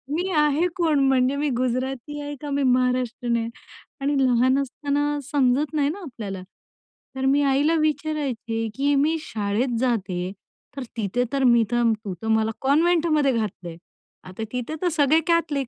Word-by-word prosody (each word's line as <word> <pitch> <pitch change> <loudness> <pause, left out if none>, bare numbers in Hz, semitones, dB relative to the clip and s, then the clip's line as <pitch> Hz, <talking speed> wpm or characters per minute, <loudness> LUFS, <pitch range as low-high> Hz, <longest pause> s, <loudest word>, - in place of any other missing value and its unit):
मी 360 +3 -1
आहे 300 +3 +3
कोण? 320 -5 +2
म्हणजे 260 +1 +2
मी 290 +1 0
गुजराती 260 +3 -2
आहे 290 0 -5
का 295 - -5
मी 280 0 0
महाराष्ट्रीयन 250 -2 +1
आहे? 230 0 -2 0.5
आणि 285 +1 0
लहान 255 +1 +3
असताना 290 +2 -1
समजत 280 +2 +2
नाही 290 -2 +1
ना 380 +6 -5
आपल्याला. 215 - -7 0.7
तर 265 0 -2
मी 280 +2 +3
आईला 285 +4 +2
विचारायची 280 -7 -2
की 285 +2 +1
मी 310 +4 +2
शाळेत 225 +2 -2
जाते 190 -7 -1 0.5
तर 270 - -3
तिथे 225 +3 0
तर 275 -1 +1
मी 235 -2 +5
तर 240 -1 +3
तू 190 - -3
तर 225 - -5
मला 220 0 +2
कॉन्व्हेंटमध्ये 310 0 +3
घातलंय 185 -7 -4 0.5
आता 185 +4 -7
तिथे 250 +4 -4
तर 360 - +1
सगळे 295 +2 +4
कॅथलिक. 315 -6 +1
270 Hz, 155 wpm, -24 LUFS, 235-295 Hz, 0.7 s, मी